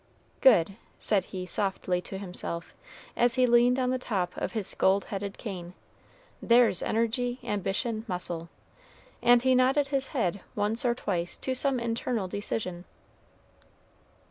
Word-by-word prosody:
"Good," 200 -6 +5 0.2
said 205 -3 +1
he 185 -1 -6
softly 185 -1 -1
to 195 - -7
himself, 180 -3 -4 0.4
as 240 0 +3
he 255 -1 +4
leaned 240 +1 +4
on 255 -1 +1
the 255 - -1
top 190 -8 -2
of - - -3
his 215 -4 -2
gold 195 +1 +2
headed 200 0 -4
cane; 180 -5 -7 0.7
"there's 235 -5 +4
energy, 240 +2 0
ambition, 210 +1 -2
muscle;" 175 -3 -4 0.7
and 240 0 +5
he 260 0 +4
nodded 265 +3 +3
his 270 -1 0
head 200 - -1
once 215 +4 -1
or 240 -1 +2
twice 175 -7 -2
to 260 - -1
some 260 0 +2
internal 230 -3 -2
decision. 185 -2 -3
215 Hz, 140 wpm, -28 LUFS, 185-245 Hz, 0.7 s, Good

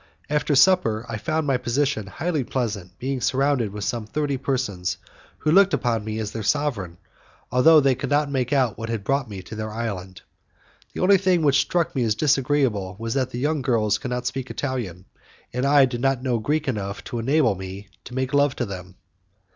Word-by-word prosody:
After 150 0 +1
supper, 130 - +4
I 115 - -4
found 160 +4 -1
my 135 -3 +2
position 125 -3 -1
highly 155 - -2
pleasant, 105 -8 -3
being 130 0 -3
surrounded 130 -3 +1
with 105 0 -6
some 110 0 -2
thirty 145 +3 -1
persons 125 -10 -2 0.4
who 155 - 0
looked 195 +3 +5
upon 115 -3 -1
me 110 0 -4
as 110 -2 -3
their 115 - -5
sovereign, 105 - -1 0.5
although 155 +6 +6
they 135 -2 +3
could - - -4
not 145 +1 +2
make 130 -2 -1
out 130 -8 +1
what 115 0 -5
had 115 -3 -3
brought 135 0 0
me 95 -3 -7
to 110 - -10
their 110 0 -4
island. 100 -5 -5 0.7
The - - -4
only 190 +1 +5
thing 185 -3 +2
which 140 -2 +4
struck 170 +1 -1
me 130 - +1
as 110 -2 +1
disagreeable 130 -8 +1
was 115 +1 -3
that 130 -2 0
the 120 - -6
young 150 +3 0
girls 110 -5 +1
could 125 - -5
not 125 0 -3
speak 130 +1 -3
Italian, 115 -10 -4 0.5
and 125 +2 0
I 140 -1 +6
did 120 -2 -4
not 135 -1 +1
know 125 -3 0
Greek 150 +7 -1
enough 100 -5 -3
to 120 - -5
enable 130 -1 +3
me 95 +1 -8 0.2
to 125 - -9
make 130 0 -2
love 145 -1 +3
to 120 - -2
them. 95 -2 -8
125 Hz, 205 wpm, -23 LUFS, 110-140 Hz, 0.7 s, although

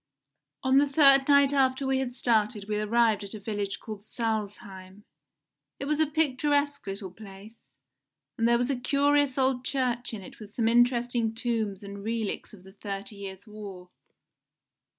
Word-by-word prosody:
On 265 +1 +5
the 285 0 +2
third 275 -2 +6
night 280 -1 +5
after 265 -1 +2
we 265 0 +1
had 250 -2 -3
started 215 -4 +1
we 210 0 -1
arrived 220 0 +2
at 200 +2 -7
a - - -7
village 205 -1 -3
called 215 -2 -8
Salzheim. 205 -4 -5 0.8
It - - -4
was 300 +1 0
a 315 - +3
picturesque 290 -2 0
little 195 -1 -5
place, 205 +2 -13 0.8
and 230 - +1
there 235 0 +4
was 245 +3 0
a - - 0
curious 285 +1 +2
old 260 -1 +1
church 250 -2 -1
in 200 - -8
it - - -13
with 210 -2 -12
some 225 -2 +1
interesting 240 -1 +2
tombs 220 -4 -2
and 200 0 -8
relics 225 -1 -3
of 195 -4 -15
the 190 0 -15
Thirty 200 +1 -6
Years 195 0 -8
War. 200 -4 -10
230 Hz, 165 wpm, -28 LUFS, 205-265 Hz, 0.8 s, third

